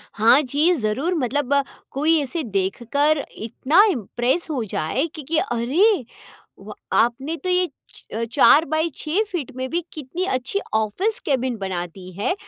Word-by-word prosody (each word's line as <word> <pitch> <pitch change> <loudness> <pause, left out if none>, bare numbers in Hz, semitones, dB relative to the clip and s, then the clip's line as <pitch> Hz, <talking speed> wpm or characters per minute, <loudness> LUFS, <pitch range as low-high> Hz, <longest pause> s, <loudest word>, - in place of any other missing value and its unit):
हाँ 230 +6 +5
जी, 295 +5 +2
ज़रूर 265 +7 -1
मतलब 285 -1 0
अ, 280 0 +3 0.3
कोई 310 +4 +2
ऐसे 290 +4 -2
देखकर 240 +9 0
इतना 280 - +3
इम्प्रेस 245 - -1
हो 265 -6 -1
जाए 160 - 0
कि 310 - -6
कि 330 - +1
अरे, 280 - +2 0.6
व - - -10 0.2
आपने 265 +8 +1
तो - - -1
ये 360 -1 +2 0.3
च 230 +1 -5
4 295 +3 +6
बाई 315 +2 0
6 330 +7 0
फीट 330 -9 -4
में 260 0 -3
भी 345 - 0
कितनी 315 +5 -4
अच्छी 260 +10 -1
ऑफिस 220 - 0
केबिन 260 -4 0
बना 190 -3 -3
दी 185 +1 -12
है। 360 - +1
275 Hz, 160 wpm, -22 LUFS, 235-325 Hz, 0.6 s, 4